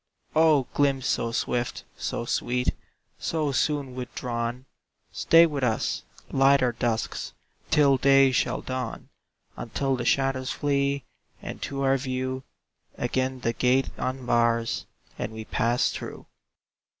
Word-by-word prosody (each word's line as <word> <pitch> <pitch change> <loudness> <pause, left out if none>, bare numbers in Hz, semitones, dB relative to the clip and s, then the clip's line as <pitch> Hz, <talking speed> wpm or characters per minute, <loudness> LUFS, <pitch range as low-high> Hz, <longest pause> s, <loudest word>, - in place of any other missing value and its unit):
O 155 -3 +5
glimpse 135 -2 +2
so 115 -1 0
swift, 120 +1 -2
so - - -3
sweet, 125 +1 0 0.5
So 155 -3 -1
soon 140 -1 0
withdrawn! 125 0 -4 0.5
Stay 165 +1 +6
with 145 -5 -2
us; 115 -3 0 0.3
light 135 0 +5
our 125 - +3
dusks 115 -1 -2 0.4
Till 140 -3 +5
day 135 0 +5
shall 125 - 0
dawn; 130 -3 -4 0.5
Until 135 +3 -1
the 125 - -3
shadows 130 +1 +1
flee, 140 -1 0 0.4
And - - -7
to 140 -1 -3
our 135 0 +3
view 130 0 -3 0.6
Again 130 +1 -1
the 115 - 0
gate 125 +2 +2
unbars, 120 -3 0 0.3
And - - -3
we 110 0 -7
pass 120 +3 +1
through. - - -7
130 Hz, 125 wpm, -26 LUFS, 120-140 Hz, 0.6 s, Stay